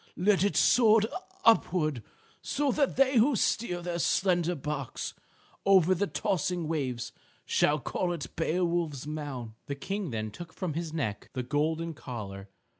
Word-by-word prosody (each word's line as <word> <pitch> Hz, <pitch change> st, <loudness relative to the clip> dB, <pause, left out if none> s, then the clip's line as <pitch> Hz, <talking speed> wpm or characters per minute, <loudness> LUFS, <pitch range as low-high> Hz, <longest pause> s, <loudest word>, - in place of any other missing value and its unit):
Let 195 Hz, +1 st, +3 dB
it 200 Hz, -, +1 dB
soar 225 Hz, -3 st, +6 dB, 0.4 s
upward 160 Hz, -, +3 dB, 0.4 s
so 285 Hz, -1 st, 0 dB
that 280 Hz, +1 st, +1 dB
they 270 Hz, -1 st, +4 dB
who 250 Hz, +5 st, +5 dB
steer 180 Hz, -4 st, 0 dB
their 175 Hz, -1 st, -2 dB
slender 175 Hz, -1 st, +2 dB
barks 145 Hz, -3 st, -4 dB, 0.5 s
over 190 Hz, -2 st, +5 dB
the 200 Hz, +3 st, 0 dB
tossing 180 Hz, +1 st, -1 dB
waves 135 Hz, -7 st, -2 dB, 0.3 s
shall 150 Hz, -, +3 dB
call 175 Hz, +5 st, -2 dB
it 165 Hz, -5 st, -5 dB
Beowulf's 170 Hz, -4 st, 0 dB
mound." 145 Hz, -6 st, -5 dB, 0.2 s
The 140 Hz, -, -3 dB
King 195 Hz, +6 st, -3 dB
then 110 Hz, -2 st, -3 dB
took 160 Hz, +9 st, -10 dB
from 180 Hz, -5 st, -3 dB
his 165 Hz, 0 st, -3 dB
neck 115 Hz, -11 st, -3 dB
the 130 Hz, -, -2 dB
golden 160 Hz, +5 st, -1 dB
collar. 100 Hz, -8 st, -7 dB
165 Hz, 145 wpm, -29 LUFS, 145-190 Hz, 0.5 s, soar